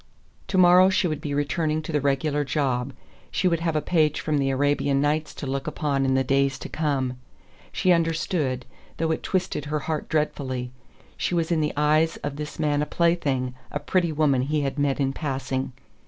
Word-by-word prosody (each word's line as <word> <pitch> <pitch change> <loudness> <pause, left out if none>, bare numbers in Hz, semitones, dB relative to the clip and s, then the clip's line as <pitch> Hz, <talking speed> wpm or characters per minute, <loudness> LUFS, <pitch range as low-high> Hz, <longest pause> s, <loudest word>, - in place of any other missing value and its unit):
To 190 - -1
morrow 180 +1 +7
she 185 - +2
would 155 -3 -3
be 145 -1 -3
returning 155 +2 0
to 160 - -5
the 150 -2 +1
regular 145 +2 +1
job. 135 -2 -1 0.4
She 185 - +1
would 170 -2 +2
have 165 -1 -1
a 155 - 0
page 155 -4 +2
from 150 -2 0
the 135 -1 +1
Arabian 140 0 +1
Nights 150 +2 0
to - - -6
look 135 +1 -3
upon 145 -3 0
in 130 0 +2
the 130 - +3
days 135 +1 +1
to - - -8
come. 135 -5 -1 0.5
She 185 - +2
understood, 160 -6 0 0.3
though 160 0 0
it 160 - -1
twisted 185 -6 -1
her 150 +1 -1
heart 155 +1 -3
dreadfully: 130 -5 -1 0.5
she 180 - -1
was 165 0 0
in 165 -2 +2
the 150 - 0
eyes 155 +2 +3
of 145 -1 -3
this 150 0 -6
man 150 -2 +1
a 150 - -1
plaything, 145 -7 +1 0.2
a - - -2
pretty 175 -3 +1
woman 145 -4 +2
he 150 +3 0
had 140 +1 -2
met 145 -1 +1
in 135 -1 +1
passing. 135 -3 -3
150 Hz, 200 wpm, -25 LUFS, 135-160 Hz, 0.5 s, morrow